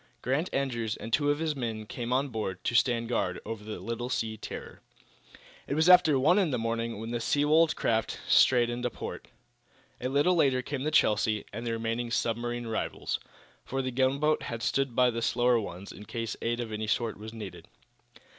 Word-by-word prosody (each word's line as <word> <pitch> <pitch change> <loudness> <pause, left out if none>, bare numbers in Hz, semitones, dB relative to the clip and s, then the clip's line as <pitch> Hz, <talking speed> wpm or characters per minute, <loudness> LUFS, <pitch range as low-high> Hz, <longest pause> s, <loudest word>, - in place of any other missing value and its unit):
Grant 140 +8 0
Andrews 120 -5 -1
and 115 - -7
two 145 +2 +3
of 145 - +2
his 155 -1 -1
men 115 -4 -3
came 120 +2 -5
on 135 +2 +1
board, 105 -6 -4
to 120 - -1
stand 115 0 +2
guard 120 -1 -1
over 110 -2 -5
the 110 0 -6
little 115 +5 -4
sea 110 -3 -1
terror. 110 - -8 0.9
It 140 - -1
was 160 +2 +3
after 180 -5 +7
one 175 +9 +4
in 185 -5 +2
the 130 - 0
morning 115 -1 -2
when 115 +1 -5
the 120 - -1
Seawold 150 +6 +3
craft 110 -1 0
strayed 120 -2 +5
into 125 +1 -2
port. - - -7 0.7
A 125 - -1
little 145 +7 +3
later 135 -7 +3
came 140 +1 -4
the - - +2
"Chelsea" 105 -7 +2
and 115 +3 -5
the 115 - 0
remaining 115 +1 -2
submarine 120 +1 -1
rivals, 110 -1 -2 0.4
for 135 0 -3
the 130 - -2
gunboat 135 +4 +2
had 115 -1 -5
stood 135 -3 0
by 125 -1 +4
the 115 0 -3
slower 120 0 +3
ones 95 -2 -7
in 105 - -11
case 115 0 -4
aid 120 +1 -1
of 115 -2 -4
any 110 0 -3
sort 110 0 -1
was 110 +1 -7
needed. 110 -4 -9
120 Hz, 195 wpm, -29 LUFS, 115-135 Hz, 0.9 s, after